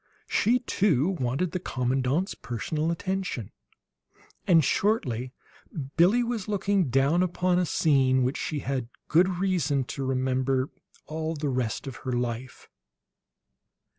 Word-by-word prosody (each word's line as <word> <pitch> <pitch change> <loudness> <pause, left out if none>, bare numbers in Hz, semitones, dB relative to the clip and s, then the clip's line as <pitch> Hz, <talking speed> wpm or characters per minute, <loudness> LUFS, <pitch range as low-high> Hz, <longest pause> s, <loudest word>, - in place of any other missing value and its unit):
She, 235 +4 +3
too, 180 - +2
wanted 135 +8 0
the 180 - -2
commandant's 130 +4 0
personal 150 +7 -3
attention; 180 - -3 1.0
and 165 -4 +6
shortly 130 - 0 0.6
Billie 195 +9 +5
was 235 -4 -3
looking 200 -5 +1
down 135 +7 +3
upon 180 0 +1
a 180 - +1
scene 130 -5 +3
which 130 +3 0
she 150 -3 -3
had 130 -3 -3 0.2
good 175 +4 +4
reason 165 -8 +1
to 140 - -4
remember 130 0 0 0.3
all 160 +1 -3
the 145 -1 -2
rest 125 -2 -2
of 135 -3 -6
her 130 - -4
life. 120 +1 -4
145 Hz, 125 wpm, -27 LUFS, 130-180 Hz, 1.0 s, and